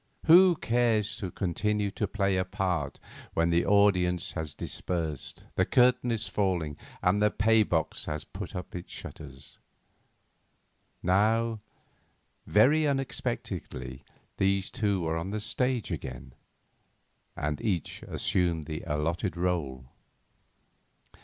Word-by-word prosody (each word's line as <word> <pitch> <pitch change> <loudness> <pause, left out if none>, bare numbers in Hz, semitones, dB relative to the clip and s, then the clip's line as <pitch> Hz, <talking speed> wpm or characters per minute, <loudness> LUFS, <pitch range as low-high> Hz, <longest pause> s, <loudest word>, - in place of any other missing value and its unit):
Who 175 +2 +8
cares 115 -5 +1
to 95 - -4
continue 100 +3 -1
to 105 +1 -2
play 100 -1 0
a 95 - +2
part 90 -7 -2 0.4
when 85 +1 +2
the 85 +1 +3
audience 90 -4 +3
has 80 -4 -4
dispersed, 80 -5 -4
the - - +2
curtain 125 0 +3
is 110 -2 -2
falling, 90 -7 0 0.3
and 95 +3 +3
the 105 - +5
pay 110 +1 +3
box 80 -6 -1
has 75 0 -4
put - - -8
up 90 0 -6
its 90 - -7
shutters? 70 -3 -9 1.4
Now, 110 +4 +2 0.9
very 145 +9 +5
unexpectedly 70 - -3 0.3
these 95 0 +1
two 100 -4 0
were 80 0 -1
on 85 +4 -3
the 105 +2 -2
stage 120 +1 -1
again, 65 -5 -6 1.0
and 75 0 -2
each 95 -8 -2
assumed 85 -4 0
the 80 0 -5
allotted 85 +5 -1
role. 80 -8 -1
95 Hz, 120 wpm, -29 LUFS, 80-110 Hz, 1.4 s, Who